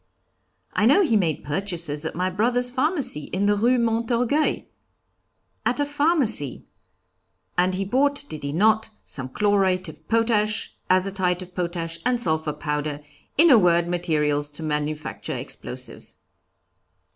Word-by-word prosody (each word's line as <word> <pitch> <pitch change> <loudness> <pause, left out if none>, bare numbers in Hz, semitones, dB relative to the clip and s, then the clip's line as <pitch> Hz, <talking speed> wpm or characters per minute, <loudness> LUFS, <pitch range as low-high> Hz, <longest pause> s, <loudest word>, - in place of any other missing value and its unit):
'I 210 - +2
know 380 +11 +5
he 270 -10 +2
made 170 -7 0
purchases 160 -2 -2
at - - -7
my 180 +2 0
brother's 245 +6 +1
pharmacy 265 - 0
in 195 +2 -2
the 205 0 +3
Rue 240 +5 +3
Montorgueil.' 235 +5 +1 1.0
'At 245 - 0
a 290 - +2
pharmacy! 285 - +2 0.9
and 180 +1 +2
he 195 +1 -2
bought, 285 +6 +1
did 155 - -7
he 140 - -3
not, 215 +7 +2 0.2
some 130 -3 -4
chlorate 190 0 +1
of 155 - -14
potash, 225 -2 +1 0.2
azotite 185 -1 +1
of 180 0 -15
potash, 170 -2 -3
and 250 0 +1
sulphur 160 -6 -1
powder; 150 -1 -3 0.4
in 325 +2 +7
a 240 - +8
word, 170 -2 +3
materials 150 -4 0
to 150 +2 -8
manufacture 150 0 -3
explosives.' - - -7
185 Hz, 135 wpm, -24 LUFS, 160-235 Hz, 1.0 s, a